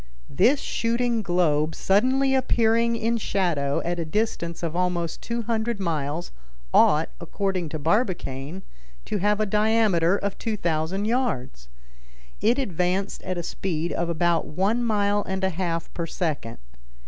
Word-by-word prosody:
This 245 - +4
shooting 235 -1 0
globe 160 -5 +1
suddenly 260 +7 +2
appearing 235 -3 +2
in 230 +1 0
shadow 170 -10 0
at 175 0 -1
a - - 0
distance 170 -1 -2
of 165 -1 -2
at 180 0 +2
most 170 -2 -3
200 235 -1 -2
miles, 160 -2 -2 0.4
ought, - - +5
according 190 -4 -2
to 155 - -4
Barbicane, 165 - -1 0.4
to 205 - -2
have 205 +2 +2
a 215 - +2
diameter 210 -4 +3
of 200 -1 -3
2,000 185 -2 -1
yards. 165 - -2 0.7
It 235 +4 +3
advanced 190 - -1
at 185 -1 -4
a 175 - -3
speed 170 -1 -2
of 170 0 -1
about 170 0 +1
one 200 +9 0
mile 205 -2 +2
and 190 0 -3
a 190 - +2
half 170 -2 -3
per 170 -1 -3
second. 150 -9 -3
190 Hz, 140 wpm, -25 LUFS, 165-220 Hz, 0.7 s, ought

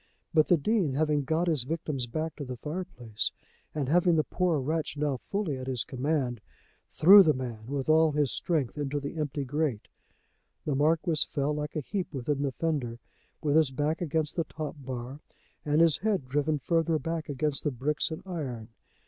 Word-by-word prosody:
But 155 -1 +5
the 175 - +5
Dean 175 -4 +1
having 150 -1 +1
got 160 +5 +1
his 155 -6 +2
victim's 150 -3 -2
back 155 +6 -3
to 145 - -5
the 125 -2 -6
fireplace, 125 - -4 0.4
and 145 -4 -1
having 175 +3 +4
the 155 - +3
poor 175 -3 0
wretch 155 +3 -2
now 145 -2 0
fully 180 - -3
at 130 - -6
his 125 -4 -1
command, 130 -3 -1 0.5
threw 200 +5 +9
the 155 -5 +4
man 120 -4 -6
with 135 0 -3
all 160 0 +5
his 145 -3 +1
strength 150 -5 -1
into 145 0 -1
the 145 +3 -5
empty 145 -2 -2
grate. 140 -5 -2 0.8
The 150 - 0
Marquis 155 +2 +2
fell 145 +1 0
like 150 0 -4
a 155 - 0
heap 190 +4 -3
within 140 +2 -1
the 140 -1 0
fender, 135 -6 -2 0.5
with 145 -1 +2
his 160 -3 +5
back 150 +5 -1
against 155 -2 -1
the 165 - 0
top 150 0 -6
bar 130 +1 -6 0.4
and 150 +2 +2
his 165 -4 +5
head 200 -10 -1
driven 145 +3 +1
further 165 +2 +1
back 160 +1 -4
against 145 0 -1
the 150 - +1
bricks 140 +3 -1
and 160 - -6
iron. 130 - -5
150 Hz, 185 wpm, -29 LUFS, 135-160 Hz, 0.8 s, threw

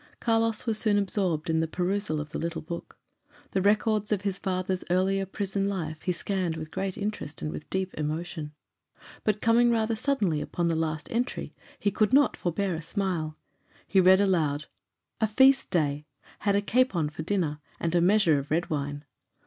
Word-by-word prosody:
Carlos 225 -1 +1
was 220 -2 0
soon 215 -2 +2
absorbed 190 -6 0
in 160 -1 +2
the 160 - +1
perusal 180 -1 -1
of 150 0 -6
the - - -3
little 165 -1 -3
book. 170 +2 -7 0.5
The 190 - +1
records 210 +1 +2
of 205 -2 0
his 195 -1 -1
father's 185 0 -1
earlier 190 +2 +1
prison 195 0 -1
life 160 -5 -4
he 180 - 0
scanned 180 -2 -2
with 155 -1 -7
great 190 0 -3
interest 205 - -4
and 75 - -2
with 75 - -8
deep 190 0 -2
emotion; 155 0 -4 0.7
but 210 -1 0
coming 235 +1 +4
rather 225 -1 +1
suddenly 220 - 0
upon 170 -1 -1
the 165 - +1
last 160 -1 -2
entry, 245 +2 -2 0.2
he 205 - 0
could 215 +4 +1
not 280 -1 +5
forbear 185 +2 -1
a 160 - -4
smile. 165 -3 -2 0.5
He 195 - +4
read 185 +1 +7
aloud: 155 -7 +1 0.5
"'A 220 - +2
feast 265 +5 +5
day. 150 -4 0 0.3
Had 200 -1 +1
a 200 - +3
capon 210 -9 +2
for 160 - -6
dinner, 160 -4 -1 0.2
and 165 0 -1
a 175 - +4
measure 175 -5 +4
of 140 +2 -7
red 165 +3 0
wine. 145 0 -3
185 Hz, 180 wpm, -27 LUFS, 160-205 Hz, 0.7 s, read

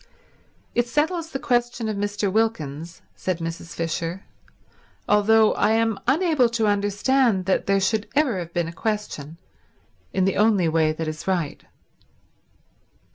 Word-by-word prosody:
"It 240 0 +1
settles 320 +6 0
the 270 - -3
question 240 -3 0
of 215 - -2
Mr. 205 -1 -1
Wilkins," 170 -8 -2
said 185 -2 -2
Mrs. 165 0 -6
Fisher, 165 +2 -3 0.8
"although 215 +1 +4
I 220 - +2
am 225 -2 +1
unable 300 -3 +3
to 225 - +1
understand 205 +1 +2
that 190 - 0
there 195 0 +3
should 210 +3 0
ever 275 -10 +2
have 170 -1 -6
been 170 -1 -1
a 165 - -7
question, 170 -7 -4 0.7
in 190 -1 +1
the 195 - 0
only 205 -5 +3
way 160 -1 +2
that 160 +1 -4
is 155 +3 -6
right." 175 -6 -1
205 Hz, 140 wpm, -23 LUFS, 170-230 Hz, 0.8 s, although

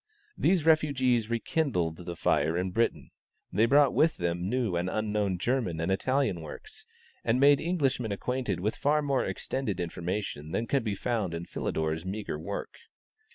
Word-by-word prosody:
These 180 -4 +2
refugees 130 -8 +3
rekindled 115 - 0
the 85 -1 -6
fire 80 0 +1
in 90 +1 -1
Britain. 115 +5 0 0.4
They 110 +2 +4
brought 140 +1 +5
with 160 0 +3
them 85 +1 -1
new 120 -6 0
and 90 +2 0
unknown 105 -2 0
German 110 -5 -1
and 85 +3 0
Italian 130 -3 +1
works, 80 - -9 0.4
and 115 +3 +2
made 140 0 +6
Englishmen 140 - 0
acquainted 125 +1 -2
with 105 +3 0
far 150 +1 +2
more 140 -2 +1
extended 110 -9 -3
information 85 -2 -4
than 115 - 0
could 135 +2 +1
be 105 -3 -1
found 105 -6 -1
in 85 +1 -5
Philidor's 80 -1 -2
meagre 95 -4 -4
work. 100 +5 -6
110 Hz, 155 wpm, -29 LUFS, 90-130 Hz, 0.4 s, made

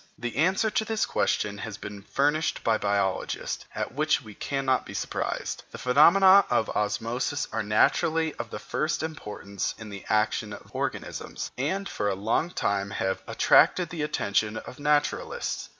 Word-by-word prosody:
The 120 0 -4
answer 190 +8 +2
to 220 - +1
this 220 0 0
question 100 -1 0
has 110 -1 -6
been 105 -1 -8
furnished 145 +8 0
by 110 -1 +2
biologists, 100 -2 -1
at - - -2
which 155 +3 +2
we 110 -2 -11
cannot 135 +2 0
be - - -9
surprised. - - -3
The - - -9
phenomena 185 +9 +6
of 120 -3 +1
osmosis 115 +7 -1
are - - -1
naturally 155 +9 +2
of - - -4
the - - -5
first 155 0 -2
importance 105 -10 -4
in 110 -1 -9
the 100 -1 -8
action 105 0 +1
of - - -12
organisms, - - -4
and 190 +10 -1
for 105 - -1
a 95 - 0
long 110 - 0
time 100 - -1
have 95 0 -2
attracted 180 -3 +4
the 170 -3 -4
attention 110 -6 0
of 125 - -9
naturalists. 150 0 0
125 Hz, 160 wpm, -27 LUFS, 105-155 Hz, -, phenomena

